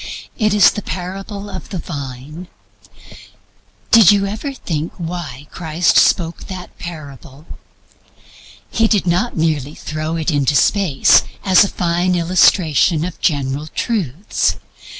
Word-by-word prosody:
It 215 -2 +1
is 205 - +6
the 210 - -5
parable 195 +3 -6
of 190 -2 -8
the 195 - -5
Vine. 145 +1 -7 1.4
Did 225 -5 +8
you 200 -1 +2
ever 215 +8 -4
think 165 - -4
why 160 -6 -6
Christ 165 0 0
spoke 170 -2 +2
that 185 -2 -9
parable? 145 -4 -10 1.3
He 225 - +2
did 210 -4 +1
not 180 +6 0
merely 155 -3 -1
throw 155 +1 -4
it 165 +1 -1
into 145 -1 +1
space 180 -5 +4 0.2
as 190 -1 +6
a - - 0
fine 175 +1 0
illustration 170 -2 +3
of 180 - -8
general 145 -1 -1
truths. 185 - -1
170 Hz, 125 wpm, -18 LUFS, 150-190 Hz, 1.4 s, Did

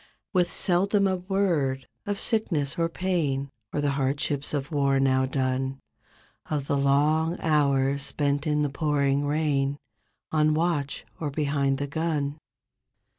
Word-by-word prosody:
With 180 -2 +3
seldom 195 +4 +2
a 190 -1 +1
word 175 -8 0 0.2
of 205 -1 -2
sickness 160 - +1
or 165 0 +2
pain 155 -7 -1 0.2
Or 145 - -1
the 145 -1 +1
hardships 140 +1 0
of 145 0 -3
war, 140 -2 +2
now 130 -1 +2
done; 130 0 -1 0.7
Of 145 -3 -1
the 140 - 0
long 150 +5 +2
hours 140 -3 +2
spent 145 +1 -1
in 150 0 +2
the 145 - 0
pouring 145 -1 +1
rain 145 -2 0 0.5
On 155 -1 +3
watch 155 -4 -1
or 150 - -2
behind 140 -2 0
the 140 - -2
gun. 150 -1 -2
145 Hz, 135 wpm, -26 LUFS, 140-160 Hz, 0.7 s, With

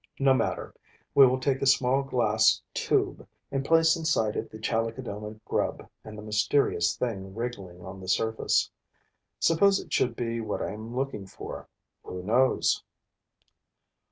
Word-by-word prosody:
No 135 -1 +4
matter: 130 - -1 0.4
we 140 -2 +8
will 130 +1 +1
take 135 0 0
a 135 - +1
small 135 0 +3
glass 110 -5 +3
tube - - 0 0.2
and 135 -1 -1
place 165 +1 +4
inside 150 -10 0
it - - -3
the 110 - -10
Chalicodoma 110 -1 -3
grub - - -2 0.2
and 110 0 -10
the 105 - -8
mysterious 105 -4 +1
thing 95 -5 -4
wriggling 100 -7 -6
on 95 +1 -8
the 95 - -10
surface. 110 +4 +1 0.7
Suppose 195 +4 +4
it 165 - -9
should 120 -2 +1
be 115 -1 -2
what 110 -2 -3
I - - -3
am 110 +3 -8
looking 130 -7 -3
for? 95 - -9 0.3
Who 90 0 -7
knows? 125 +6 +2
115 Hz, 150 wpm, -27 LUFS, 105-135 Hz, 0.7 s, we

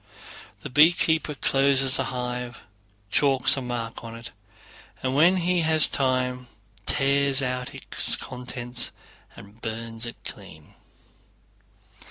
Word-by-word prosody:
The - - -7
beekeeper 160 +1 +3
closes 135 0 +2
the - - 0
hive, 125 -1 -4 0.5
chalks 135 -3 +4
a 135 - -3
mark 120 -2 -5
on 115 0 -8
it, 115 0 -9 0.7
and 130 0 0
when 170 +7 +5
he 180 0 +1
has 160 -1 +4
time 125 -1 -1 0.4
tears 140 0 +2
out 125 -1 -3
its - - -2
contents 125 -1 -1 0.4
and 100 +3 -15
burns 115 +1 -4
it 120 - -8
clean. - - -10
130 Hz, 115 wpm, -25 LUFS, 125-140 Hz, 0.7 s, when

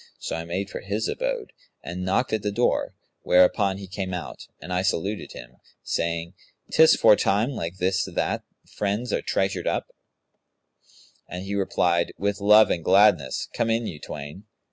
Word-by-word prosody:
So - - -4
I 80 0 -5
made 95 +4 -4
for - - -5
his 105 +2 -2
abode - - -3 0.3
and 90 +2 -5
knocked 95 +7 0
at 110 - 0
the 105 - -2
door, 120 +4 0 0.3
whereupon 95 +2 +3
he 100 - -8
came 95 -1 -4
out, 90 - -7
and 90 +3 -6
I 90 - +1
saluted 95 +2 -2
him, 60 +1 -12 0.3
saying, 85 +1 -2 0.4
'Tis 160 0 +6
for - - +6
time 105 +6 +1
like 85 -7 -5
this 95 +1 +1
that 95 - -2 0.3
friends 105 +4 -2
are - - 0
treasured 95 0 -1
up'; - - -2 1.4
and 90 +1 -6
he 100 +1 -5
replied, 85 -3 +1
'With 100 +1 -1
love 105 +2 +6
and 85 - -1
gladness! 100 +4 +3
Come 115 - 0
in 115 +1 +1
you 80 -8 -6
twain.' 75 +8 -8
95 Hz, 165 wpm, -25 LUFS, 90-105 Hz, 1.4 s, Tis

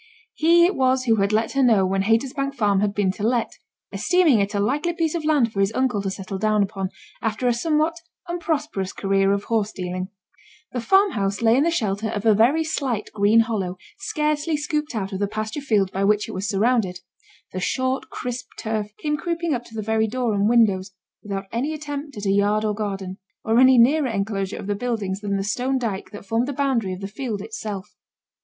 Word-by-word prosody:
He 340 +2 +5
it 370 - +2
was 260 0 +2
who 225 -3 +3
had 200 0 +1
let 220 +1 +1
her 275 - +1
know 220 -7 +4
when 195 +1 0
Haytersbank 275 +6 0
Farm 205 -5 +2
had 205 0 +1
been 200 -2 +2
to 200 - -10
let; 235 +1 0 0.3
esteeming 350 - +3
it 200 +1 -1
a - - +1
likely 290 - 0
piece 325 -2 -1
of 335 -2 -2
land 285 -8 +2
for 195 - -3
his 195 +1 +2
uncle 255 -5 +1
to 195 - -2
settle 190 0 -5
down 215 0 +2
upon, 195 -1 -3 0.3
after 225 +2 -1
a 245 - +4
somewhat 315 +5 0 0.3
unprosperous 300 - -2
career 195 0 +1
of 200 0 0
horse 220 -2 0
dealing. 185 0 -4 0.6
The 245 - -3
farmhouse 230 - +2
lay 225 0 +5
in 275 - +3
the - - +3
shelter 215 - -1
of 210 0 -4
a 220 - +6
very 250 +10 +3
slight 265 -9 -2
green 215 +2 +4
hollow 200 -6 -2 0.2
scarcely 305 -2 0
scooped 300 -2 -2
out 195 -2 -3
of 190 - -3
the 205 - +1
pasture 215 +6 -4
field 210 -8 +1
by 195 - -1
which 210 +1 +2
it - - -6
was 190 +2 -3
surrounded; 200 -3 +1 0.5
the 185 - -3
short 260 +7 -1
crisp 250 +1 -5
turf 215 -1 -3
came 300 -1 -1
creeping 335 -1 -2
up 245 -2 -2
to 225 - -13
the 215 - -3
very 220 +1 +1
door 245 0 -1
and 205 +1 +2
windows, 200 -5 +3 0.3
without 200 -2 -4
any 280 +7 -1
attempt 290 -2 -6
at 205 - -5
a 195 - +2
yard 205 +2 +2
or 210 - +1
garden, 195 -2 -4 0.2
or 225 +2 +3
any 260 0 +7
nearer 275 +5 +5
enclosure 195 -3 -2
of - - -7
the 205 - 0
buildings 205 -3 -2
than 200 -1 -1
the 195 - -2
stone 250 +6 0
dyke 215 -6 -3
that 205 -1 -10
formed 225 +5 0
the 285 - -3
boundary 255 -8 0
of 185 - -8
the 195 - -4
field 220 0 -4
itself. 210 - -6
220 Hz, 215 wpm, -23 LUFS, 200-270 Hz, 0.6 s, any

